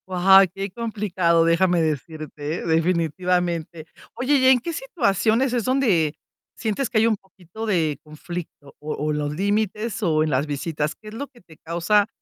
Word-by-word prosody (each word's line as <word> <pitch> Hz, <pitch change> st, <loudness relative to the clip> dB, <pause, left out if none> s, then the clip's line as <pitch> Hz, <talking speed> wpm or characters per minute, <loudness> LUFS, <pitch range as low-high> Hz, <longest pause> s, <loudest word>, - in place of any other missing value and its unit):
Guau, 190 Hz, +1 st, +6 dB
qué 195 Hz, 0 st, -5 dB
complicado, 190 Hz, -7 st, +1 dB
déjame 175 Hz, +1 st, +3 dB
decirte, 155 Hz, 0 st, -4 dB
¿eh?, -, -, -7 dB
definitivamente. 170 Hz, 0 st, 0 dB, 0.3 s
Oye, 260 Hz, +3 st, 0 dB
¿y 260 Hz, -, +2 dB
en 260 Hz, -1 st, +6 dB
qué 335 Hz, +8 st, -5 dB
situaciones 245 Hz, -, +1 dB
es 240 Hz, -2 st, 0 dB
donde 205 Hz, -, +1 dB, 0.4 s
sientes 230 Hz, +4 st, -2 dB
que 230 Hz, -, -1 dB
hay 220 Hz, +1 st, +4 dB
un 220 Hz, -2 st, +1 dB
poquito 190 Hz, +2 st, -10 dB
de 160 Hz, -, 0 dB
conflicto 155 Hz, -1 st, -9 dB
o 150 Hz, +1 st, -4 dB
o 150 Hz, +1 st, -2 dB
en 150 Hz, -, -1 dB
los 145 Hz, 0 st, -2 dB
límites 210 Hz, +3 st, -1 dB
o 155 Hz, -5 st, +2 dB
en 155 Hz, -, -1 dB
las 140 Hz, +3 st, 0 dB
visitas? 150 Hz, +1 st, -3 dB
¿Qué 215 Hz, -, -12 dB
es -, -, -11 dB
lo 280 Hz, +6 st, -5 dB
que 255 Hz, -3 st, -21 dB
te 160 Hz, -3 st, -18 dB
causa? 175 Hz, +5 st, +1 dB
180 Hz, 175 wpm, -23 LUFS, 160-220 Hz, 0.4 s, Guau